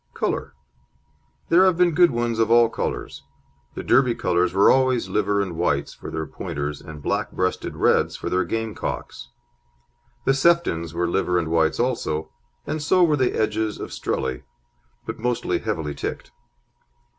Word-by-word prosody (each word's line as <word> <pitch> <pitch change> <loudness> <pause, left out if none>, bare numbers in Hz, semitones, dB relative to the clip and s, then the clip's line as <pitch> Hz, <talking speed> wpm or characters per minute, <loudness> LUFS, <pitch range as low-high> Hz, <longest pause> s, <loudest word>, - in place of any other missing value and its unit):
COLOUR - - -2 0.9
There 175 +3 +6
have 185 -3 +3
been 180 -1 +4
good 175 +2 +5
ones 120 -1 -1
of 115 -1 +2
all 120 0 +5
colours. - - -4 0.5
The - - -5
Derby 125 -2 +3
colours 90 0 +1
were 95 +2 +5
always 130 -6 +2
liver 100 0 +1
and 90 -4 -6
whites 85 +2 0
for - - -9
their 80 0 -3
Pointers 75 0 -5
and 75 -2 -10
black - - -1
breasted 90 0 -2
reds - - +2
for - - -6
their 90 0 +1
game 110 +4 -3
cocks. - - -6 1.0
The 135 - +4
Seftons 135 - +1
were 85 0 0
liver 90 0 0
and 85 -2 -1
whites 80 -1 +1
also, 80 -11 -1 0.3
and 155 - -3
so 180 +4 +3
were 155 -3 +4
the 130 -3 0
Edges 110 -1 -1
of - - -6
Strelly, 65 -2 -2 0.6
but - - -6
mostly 125 +1 -1
heavily 75 -3 -3
ticked. - - -6
105 Hz, 160 wpm, -23 LUFS, 85-130 Hz, 1.0 s, There